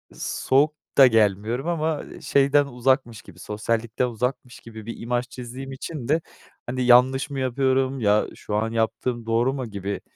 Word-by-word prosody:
Soğuk 145 +4 +1 0.2
da 135 - +9
gelmiyorum 110 - +1
ama, 160 -3 -1
eee, - - -12
şeyden 140 +1 +3
uzakmış 125 -3 0
gibi, 90 -3 -16
sosyallikten 115 +4 -2
uzakmış 125 +1 -4
gibi 110 -2 -11
bir 115 - -6
imaj 120 +1 -2
çizdiğim 130 +2 -8
için 135 -1 -6
de, 155 +3 +2 0.5
hani, 130 +1 -2
"Yanlış 125 +3 +5
mı 140 -1 -4
yapıyorum? 130 +1 +1
Ya 105 -1 +2
şu 105 - -5
an 115 +1 0
yaptığım 115 +1 -1
doğru 115 +4 +1
mu?" 130 -3 -4
gibi, 100 0 -4
125 Hz, 160 wpm, -24 LUFS, 115-135 Hz, 0.5 s, da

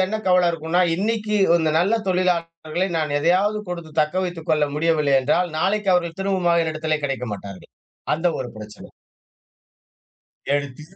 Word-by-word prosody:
என்ன 215 +3 -2
கவலை 180 -1 +4
இருக்கும்னா, 165 +2 -1
இன்னிக்கி 210 +2 -1 0.2
இந்த 160 -2 +1
நல்ல 190 +6 +2 0.2
தொழிலாளர்களை 175 -1 -1
நான் 150 -2 -1
எதையாவது 190 +7 +2
கொடுத்து 170 -3 -6
தக்க 155 +3 0
வைத்துக் 170 -3 -6
கொள்ள 150 -1 +3
முடியவில்லை 150 -3 +2
என்றால், 175 +6 +1
நாளைக்கு 200 +2 +1
அவர்கள் 170 0 -1
திரும்பவும் 180 -3 +2
என்னிடத்திலே 155 -1 -2
கிடைக்க 130 -3 -2
மாட்டார்கள். 100 -1 -9 0.4
அந்த 165 +3 -1
ஒரு 125 -2 -4
பிரச்சன 105 -1 -11 1.6
எடுத்து 145 0 -3
165 Hz, 135 wpm, -22 LUFS, 150-180 Hz, 1.6 s, கவலை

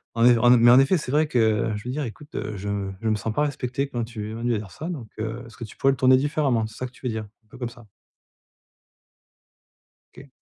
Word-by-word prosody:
En 115 0 +3
ef 120 -1 +6
en 120 +2 +5
é 125 - +8
mais 120 +1 +7
en 130 - +8
effet 145 +7 +3
c'est 140 -3 -5
vrai 155 +1 +3
que, 115 -3 +2
je 105 - -8
veux 125 - -4
dire: 150 +3 -2
«écoute, 140 +5 -10
heu, 105 -1 -4
je 100 0 -3
je 115 - -1
me 110 - +3
sens 110 +1 -3
pas 145 - +1
respecté 140 -2 -2
quand 120 -3 -3
tu 110 -2 -6
es 110 - -6
venu 120 +1 -1
à 110 - 0
dire 100 -3 -8
ça 160 - -6
donc 145 -11 -5
heu, 115 +3 -4
est-ce 115 - -15
que - - -12
tu 110 - -12
pourrais 135 - +3
le 135 - -3
tourner 130 0 +5
différemment», 135 -4 +1
c'est 110 +1 -12
ça 130 - -4
que - - -11
tu 130 - -10
veux 120 - 0
dire? 110 -1 -4 0.2
Un - - -34
peu 130 - -14
comme 120 -2 -3
ça. 120 -1 -15 2.3
OK. - - -14
120 Hz, 275 wpm, -24 LUFS, 110-130 Hz, 2.3 s, é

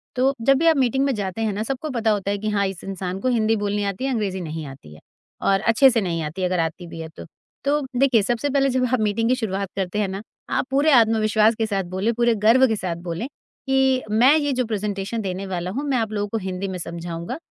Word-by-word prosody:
तो 265 +2 +2
जब 275 +4 +4
भी 330 +4 +2
आप 320 -2 +5
मीटिंग 265 0 +2
में 275 - +1
जाते 200 +1 -4
हैं 220 -2 0
ना, 210 +2 -2
सबको 270 +5 -4
पता 230 -3 +1
होता 200 -1 -1
है 205 - -1
कि 215 +1 -2
हाँ, 200 -1 +1
इस 190 -3 -7
इंसान 190 -1 -4
को - - -1
हिंदी 225 -2 +2
बोलनी 205 0 -1
आती 200 +6 -3
है, 270 - 0
अंग्रेज़ी 200 -5 -2
नहीं 160 -2 -5
आती 135 - -12
है 75 - -14 0.4
और 195 0 +3
अच्छे 230 +4 +5
से 230 -2 +1
नहीं 170 -4 -2
आती 160 +5 -4
अगर 180 -1 0
आती 165 +2 -2
भी 165 - -9
है 160 0 -6
तो। - - -8 0.4
तो 295 +1 +2 0.2
देखिए, 260 -6 +4
सबसे 240 +7 -1
पहले 275 0 +2
जब 255 0 +1
आप 255 - +3
मीटिंग 215 +2 +1
की 255 - +4
शुरुआत 200 -5 -3
करते 190 +2 -2
हैं 205 - +1
ना, 190 +1 -5 0.3
आप - - 0
पूरे 285 +3 +3
आत्मविश्वास 220 -2 +4
के 225 - 0
साथ 195 -3 -1
बोलें, 200 +5 0
पूरे 235 0 +2
गर्व 230 +5 +5
के 220 - 0
साथ 185 -4 -3
बोलें 170 +9 -3 0.4
कि, 265 -1 +2
"मैं 250 +7 +5
ये 290 -2 0
जो 255 -1 0
प्रेज़ेंटेशन 210 0 -3
देने 190 0 -4
वाला 180 -1 -3
हूँ, 275 +7 -3
मैं 260 - +2
आप 220 -2 -1
लोगों 205 -1 -1
को 225 - -2
हिंदी 190 +1 -3
में 190 -1 -4
समझाऊँगा 170 - -5
215 Hz, 255 wpm, -22 LUFS, 190-250 Hz, 0.4 s, आप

